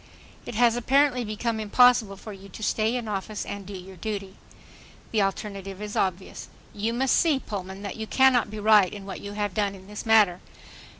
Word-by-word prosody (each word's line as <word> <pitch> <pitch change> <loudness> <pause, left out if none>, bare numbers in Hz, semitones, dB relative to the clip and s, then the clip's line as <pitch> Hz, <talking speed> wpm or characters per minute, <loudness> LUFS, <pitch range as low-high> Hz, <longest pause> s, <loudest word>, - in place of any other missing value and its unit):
It - - -6
has 235 0 +4
apparently 255 +1 +2
become 220 +1 -2
impossible 220 -1 +4
for 215 +2 -9
you 195 0 -12
to 215 - -9
stay 220 +3 +1
in 240 -3 -3
office 210 +1 -4
and 200 -2 -7
do 200 -1 -6
your 185 +1 -11
duty. 200 -2 -5 0.8
The 220 - +2
alternative 195 -1 -3
is 210 0 -6
obvious. 190 0 -2 0.3
You 215 +2 -1
must 260 +2 +2
see, 320 -5 +3
Pullman, 195 -5 -6
that 200 - -5
you 220 0 -5
cannot 260 -3 +4
be 215 0 -7
right 210 -3 +5
in 200 -2 -8
what 195 - -7
you 200 0 -7
have 205 -2 -2
done 200 -1 0
in 190 -1 -14
this 210 +1 -7
matter. 210 -6 +4
210 Hz, 195 wpm, -26 LUFS, 195-230 Hz, 0.8 s, right